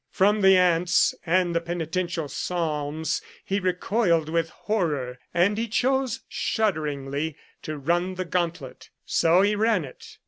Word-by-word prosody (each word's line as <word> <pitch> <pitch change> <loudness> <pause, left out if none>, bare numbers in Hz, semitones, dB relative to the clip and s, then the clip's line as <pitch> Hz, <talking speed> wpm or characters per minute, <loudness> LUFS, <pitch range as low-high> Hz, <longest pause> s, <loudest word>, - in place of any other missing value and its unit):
From 205 +2 +2
the 190 -1 +7
ants 175 -1 +3
and 175 0 +2
the 170 - +1
penitential 170 -1 -3
psalms 155 0 -2 0.2
he 195 +1 0
recoiled 180 -3 +1
with 165 0 0
horror, 150 - -2
and 190 +5 +2
he 230 - -1
chose 260 +2 0
shudderingly 150 - -2 0.2
to 155 -1 -5
run 175 +6 0
the 185 0 -3
gauntlet 170 -6 -3 0.2
So 170 +3 +3
he 205 +1 +2
ran 210 -5 +2
it. 130 - -13
175 Hz, 135 wpm, -25 LUFS, 160-195 Hz, 0.2 s, the